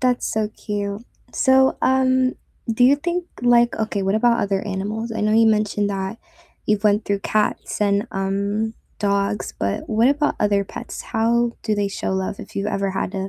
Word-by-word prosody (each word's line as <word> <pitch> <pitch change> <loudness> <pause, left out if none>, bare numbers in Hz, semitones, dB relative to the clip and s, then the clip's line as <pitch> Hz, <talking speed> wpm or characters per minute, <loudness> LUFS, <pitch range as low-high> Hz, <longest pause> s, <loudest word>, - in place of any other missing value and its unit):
That's 250 -1 +1
so 215 -1 0
cute. 205 -1 -4 0.3
So, 265 0 +4
um, 260 0 +3 0.4
do 245 +2 +3
you 275 +3 +6
think 345 +4 -2 0.2
like 240 0 +4
Okay, 215 -2 -2
what 195 +1 +1
about 235 +2 +3
other 195 -1 0
animals? 215 +3 -3
I - - -3
know 210 0 +1
you 225 +1 +5
mentioned 210 -1 +1
that 195 +2 -4 0.5
you've 210 0 +1
went 210 0 +3
through 200 -1 -1
cats 215 +1 -1
and, 205 +2 +2
um, 200 +3 -1 0.2
dogs, 200 0 -1
but 100 0 -2
what 225 +3 +3
about 295 +1 +1
other 205 -1 +2
pets? - - -8
How 235 +1 +1
do 215 - 0
they 205 -1 0
show 195 - -3
love 190 +1 -2
if - - -11
you 200 - -2
ever 195 -1 -1
had 190 0 -3
215 Hz, 180 wpm, -21 LUFS, 200-235 Hz, 0.5 s, you